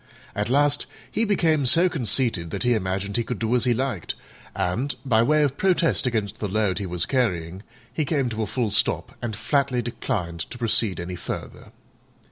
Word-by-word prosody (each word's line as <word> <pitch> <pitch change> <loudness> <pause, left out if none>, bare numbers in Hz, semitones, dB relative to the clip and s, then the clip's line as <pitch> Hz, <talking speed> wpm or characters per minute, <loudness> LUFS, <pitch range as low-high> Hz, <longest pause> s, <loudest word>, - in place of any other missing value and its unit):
At 105 +2 -2
last 145 +2 +2 0.2
he 225 - +1
became 160 - +2
so 170 +8 +6
conceited 115 - -1
that - - -3
he 120 0 +3
imagined 100 0 -1
he 120 - +1
could 125 0 -4
do 115 +3 0
as 125 - +2
he 125 - +4
liked, 125 - -2 0.4
and, 120 +11 -1
by 115 -4 +4
way 150 +5 +4
of 140 -1 0
protest 175 -7 +2
against 110 -3 -2
the 105 - -1
load 100 -2 +1
he 100 - -3
was 90 -2 0
carrying, 95 -9 -1 0.3
he 155 - 0
came 140 -2 0
to 110 -1 -3
a 110 - -1
full 115 0 -1
stop 105 - +1
and 115 -3 -3
flatly 125 +2 +1
declined 90 -7 -3
to - - -7
proceed 110 -5 +1
any 90 +1 -4
further. 85 - -7
115 Hz, 190 wpm, -24 LUFS, 100-135 Hz, 0.4 s, so